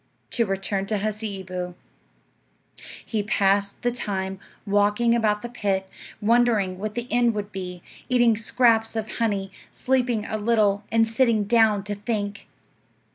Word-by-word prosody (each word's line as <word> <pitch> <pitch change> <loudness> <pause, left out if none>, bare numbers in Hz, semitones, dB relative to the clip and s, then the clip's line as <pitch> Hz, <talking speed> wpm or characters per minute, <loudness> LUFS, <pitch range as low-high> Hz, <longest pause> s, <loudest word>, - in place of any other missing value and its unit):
To 230 -3 +1
return 195 0 -2
to 215 +1 0
Hasseeboo. 195 -4 -4 1.3
He 220 -2 -1
passed 200 0 +1
the 245 - +2
time 195 -5 -3 0.3
walking 205 +3 +2
about 215 -2 +1
the - - -3
pit, 195 -5 -1 0.3
wondering 215 -4 +2
what 210 +1 -4
the 240 0 -3
end 240 -1 +3
would 205 0 -4
be, 180 -2 -6 0.3
eating 240 -3 +4
scraps 230 -1 +2
of 220 0 -4
honey, 200 -4 -1 0.2
sleeping 250 -4 0
a 215 - -3
little, 210 -2 +2
and 225 0 +4
sitting 225 -2 +2
down 215 -2 +3
to 205 +1 -4
think. 205 -1 -4
210 Hz, 135 wpm, -24 LUFS, 200-230 Hz, 1.3 s, eating